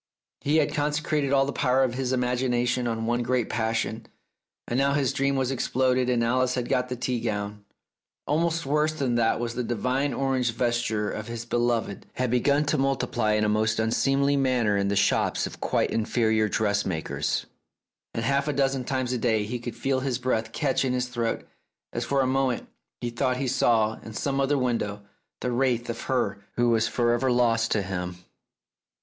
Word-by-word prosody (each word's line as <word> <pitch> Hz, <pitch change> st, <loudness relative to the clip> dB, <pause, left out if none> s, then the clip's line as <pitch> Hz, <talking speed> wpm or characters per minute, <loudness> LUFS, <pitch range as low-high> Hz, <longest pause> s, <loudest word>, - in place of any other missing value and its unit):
He 150 Hz, +3 st, +1 dB
had 155 Hz, -, +2 dB
consecrated 150 Hz, -1 st, 0 dB
all 135 Hz, -1 st, +4 dB
the 140 Hz, -, -3 dB
power 130 Hz, -1 st, +2 dB
of 125 Hz, -2 st, 0 dB
his 130 Hz, 0 st, -2 dB
imagination 125 Hz, -1 st, 0 dB
on 115 Hz, -1 st, -2 dB
one 120 Hz, +1 st, +1 dB
great 125 Hz, -1 st, 0 dB
passion, 110 Hz, 0 st, -1 dB, 0.6 s
and 120 Hz, -, 0 dB
now 140 Hz, 0 st, +3 dB
his 140 Hz, -3 st, +1 dB
dream 140 Hz, -1 st, +1 dB
was 130 Hz, -1 st, 0 dB
exploded 130 Hz, 0 st, +1 dB
and 120 Hz, -2 st, +2 dB
Alice 125 Hz, +2 st, +1 dB
had 125 Hz, -2 st, -2 dB
got 125 Hz, 0 st, +1 dB
the 125 Hz, -, -2 dB
tea 125 Hz, 0 st, -2 dB
gown! 105 Hz, -2 st, -3 dB, 0.6 s
Almost 165 Hz, +2 st, 0 dB
worse 150 Hz, +2 st, +1 dB
than 135 Hz, -6 st, -1 dB
that 115 Hz, -1 st, +2 dB
was 120 Hz, 0 st, -2 dB
that 125 Hz, 0 st, -3 dB
the 120 Hz, -, -1 dB
divine 130 Hz, +4 st, 0 dB
orange 130 Hz, -3 st, 0 dB
vesture 120 Hz, -3 st, 0 dB
of 110 Hz, -, -5 dB
his 115 Hz, 0 st, -5 dB
beloved 120 Hz, -4 st, -1 dB
had 125 Hz, -2 st, -1 dB
begun 140 Hz, +4 st, +2 dB
to 150 Hz, 0 st, +1 dB
multiply 135 Hz, -5 st, +1 dB
in 105 Hz, 0 st, +2 dB
a -, -, +2 dB
most 110 Hz, +1 st, +1 dB
unseemly 135 Hz, +5 st, +2 dB
manner 125 Hz, -6 st, +2 dB
in 100 Hz, 0 st, +1 dB
the 100 Hz, -, 0 dB
shops -, -, +2 dB
of -, -, -8 dB
quite -, -, +1 dB
inferior 110 Hz, -1 st, +1 dB
dressmakers, 100 Hz, -6 st, -1 dB, 0.7 s
and 115 Hz, -, -1 dB
half 140 Hz, +3 st, +1 dB
a 150 Hz, -, 0 dB
dozen 135 Hz, -1 st, +1 dB
times 130 Hz, -1 st, -1 dB
a 125 Hz, -, -1 dB
day 110 Hz, -3 st, +1 dB
he 120 Hz, +4 st, -4 dB
could 120 Hz, 0 st, -6 dB
feel 135 Hz, -1 st, 0 dB
his 130 Hz, -2 st, -1 dB
breath 115 Hz, -3 st, -1 dB
catch 135 Hz, 0 st, 0 dB
in 130 Hz, -1 st, 0 dB
his 125 Hz, 0 st, -1 dB
throat 120 Hz, -2 st, -2 dB, 0.5 s
as 120 Hz, -, -2 dB
for 135 Hz, +3 st, +1 dB
a -, -, +2 dB
moment 130 Hz, -2 st, 0 dB, 0.3 s
he 120 Hz, -, -2 dB
thought 125 Hz, +1 st, 0 dB
he 135 Hz, 0 st, -2 dB
saw 115 Hz, -4 st, +2 dB
in 110 Hz, -, -9 dB
some 140 Hz, +4 st, -1 dB
other 140 Hz, +1 st, +2 dB
window 115 Hz, -5 st, -1 dB, 0.4 s
the 125 Hz, -, -1 dB
wraith 120 Hz, -2 st, +1 dB
of 115 Hz, -, -7 dB
her 125 Hz, -6 st, 0 dB, 0.2 s
who 120 Hz, 0 st, +2 dB
was 115 Hz, -1 st, +3 dB
for 120 Hz, -1 st, +1 dB
ever 125 Hz, +2 st, +1 dB
lost 115 Hz, -2 st, +2 dB
to 105 Hz, -, +1 dB
him. 90 Hz, -2 st, -4 dB
125 Hz, 195 wpm, -26 LUFS, 115-135 Hz, 0.7 s, all